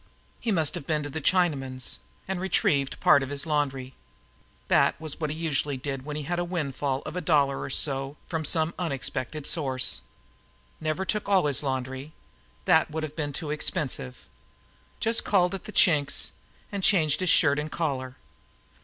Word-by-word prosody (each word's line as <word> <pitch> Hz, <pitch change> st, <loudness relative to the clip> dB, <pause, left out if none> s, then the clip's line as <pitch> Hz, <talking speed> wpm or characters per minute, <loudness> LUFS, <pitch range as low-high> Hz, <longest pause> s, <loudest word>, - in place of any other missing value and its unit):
He 230 Hz, -, -1 dB
must 160 Hz, -6 st, +2 dB
have 140 Hz, -, -6 dB
been 155 Hz, -2 st, 0 dB
to 145 Hz, -, -6 dB
the 160 Hz, -, -4 dB
Chinaman's 135 Hz, -7 st, 0 dB, 0.3 s
and 190 Hz, -1 st, -2 dB
retrieved 140 Hz, -7 st, +1 dB
part 140 Hz, -, +6 dB
of 135 Hz, -, -4 dB
his 145 Hz, +2 st, -2 dB
laundry. 135 Hz, -4 st, -1 dB, 0.7 s
This -, -, +4 dB
was 155 Hz, -2 st, -5 dB
what 155 Hz, -2 st, -1 dB
he 150 Hz, -, -3 dB
usually 150 Hz, -3 st, -1 dB
did 135 Hz, 0 st, -5 dB
when 150 Hz, -1 st, -5 dB
he 150 Hz, -, -4 dB
had 175 Hz, +4 st, -2 dB
a -, -, +1 dB
windfall 145 Hz, -6 st, -2 dB
of -, -, -7 dB
a 180 Hz, -, -2 dB
dollar 145 Hz, -4 st, +2 dB
or -, -, -4 dB
so 135 Hz, +1 st, 0 dB
from 160 Hz, -2 st, -3 dB
some 160 Hz, +1 st, +2 dB
unexpected 145 Hz, -2 st, -3 dB
source. 130 Hz, -, +2 dB, 0.8 s
Never 155 Hz, +4 st, -2 dB
took 210 Hz, +1 st, -1 dB
out -, -, -1 dB
all 190 Hz, -5 st, +5 dB
his 145 Hz, -3 st, +3 dB
laundry. 130 Hz, +1 st, -3 dB, 0.5 s
That 160 Hz, -4 st, +4 dB
would 155 Hz, +1 st, -3 dB
have 155 Hz, -1 st, -5 dB
been 150 Hz, -3 st, -2 dB
too 150 Hz, +2 st, -4 dB
expensive. 150 Hz, -, -3 dB, 0.7 s
Just 225 Hz, +1 st, +1 dB
called 185 Hz, -2 st, +3 dB
at 195 Hz, -, -6 dB
the -, -, -7 dB
Chink's 150 Hz, -7 st, +3 dB, 0.4 s
and 200 Hz, -1 st, -3 dB
changed 160 Hz, -7 st, +3 dB
his 185 Hz, -2 st, +1 dB
shirt 145 Hz, -3 st, +5 dB
and 150 Hz, +1 st, -4 dB
collar. 130 Hz, -5 st, -2 dB
150 Hz, 180 wpm, -27 LUFS, 140-170 Hz, 0.8 s, part